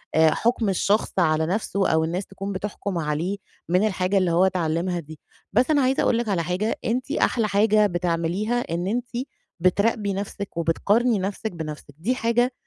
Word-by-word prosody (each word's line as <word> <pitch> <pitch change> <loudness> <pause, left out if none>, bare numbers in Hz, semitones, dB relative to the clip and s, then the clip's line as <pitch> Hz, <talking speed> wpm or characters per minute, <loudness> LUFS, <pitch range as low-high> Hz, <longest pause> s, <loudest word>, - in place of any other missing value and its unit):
آآ، 160 0 +6
حُكم 230 -2 +1
الشخص 200 +3 +1
على 160 -2 +3
نَفْسه 195 +2 0
أو 160 0 +3
الناس 175 +4 -2
تكون 195 +1 -6
بتحكم 200 -1 -4
عليه 165 +5 -1 0.3
من 185 +5 +3
الحاجة 190 0 0
اللي 185 -3 +2
هو 175 +3 +4
اتعلمها 175 -1 0
دي. 155 -1 -11 0.3
بس 250 +8 +3
أنا 290 -2 +4
عايزه 260 +1 +2
أقول 230 - +3
لِك 235 -2 -2
على 175 -4 +1
حاجة، 185 +6 -1
أنتِ 245 +2 -1
أحلى 230 -3 +1
حاجة 210 +1 +4
بتعمليها 175 +6 -1
إن 175 0 -3
أنتِ 240 +4 -2 0.5
بتراقبى 200 +3 +2
نَفْسِك 200 -1 -5
وبتقارني 205 +7 +2
نَفْسِك 205 +3 -3
بنَفْسِك، 155 -4 -7
دي 220 +11 0
حاجة 240 +1 +1
195 Hz, 170 wpm, -24 LUFS, 170-220 Hz, 0.5 s, آآ